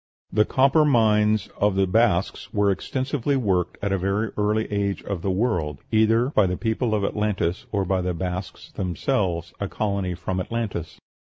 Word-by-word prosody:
The 105 +2 +4
copper 135 +4 +4
mines 110 -6 +3
of 105 -1 +2
the 95 0 +3
Basques 100 -1 +1
were 100 -1 +2
extensively 135 +6 -1
worked 95 -9 0
at 100 - 0
a 95 - +1
very 100 +4 -1
early 105 +1 +1
age 100 -1 -1
of 100 -4 -4
the 95 - -1
world, 90 - 0
either 115 +3 +3
by 105 -9 +3
the 90 0 -2
people 110 0 0
of 105 - -1
Atlantis 100 -4 -1
or 100 -2 0
by 95 0 0
the 90 -1 -2
Basques 90 +1 -5
themselves, 90 - -1
a 100 - -2
colony 100 -3 -2
from 90 +1 -3
Atlantis. 100 -4 -4
100 Hz, 170 wpm, -24 LUFS, 95-110 Hz, -, The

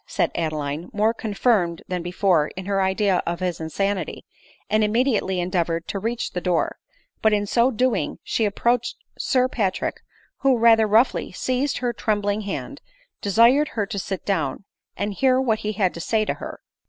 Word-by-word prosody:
said - - 0
Adeline, 155 -1 -3
more 215 +2 +2
confirmed 205 -6 0
than 180 -1 -2
before 175 -3 +2
in 190 - -5
her 195 0 0
idea 190 0 +2
of 170 0 -2
his 180 -2 -2
insanity, 195 +5 -2 0.4
and 215 +1 +2
immediately 215 -4 +1
endeavored 170 -2 -1
to 200 - -3
reach 230 +4 -2
the 180 - -3
door; 180 -2 0 0.4
but 220 -1 +4
in 205 -1 +1
so 235 +4 +3
doing 250 0 0
she 220 - 0
ap 205 - -5
proached 240 0 +1 0.2
Sir 255 -1 +2
Patrick, 200 -7 -2 0.4
who, 270 -2 +3
rather 225 -1 +5
roughly 225 +5 +2
seizing 255 +8 -1
her 245 -1 0
trembling 205 -1 0
hand, 215 +7 -5 0.4
desired 235 +9 +4
her 210 - +1
to 200 0 -4
sit 190 +1 -5
down, 160 -6 -1 0.3
and 205 0 -2
hear 260 +5 +3
what 230 -5 +1
he 215 +1 -3
had 190 -3 +1
to - - -8
say 215 +4 +1
to - - 0
her. - - -8
205 Hz, 175 wpm, -23 LUFS, 185-230 Hz, 0.4 s, rather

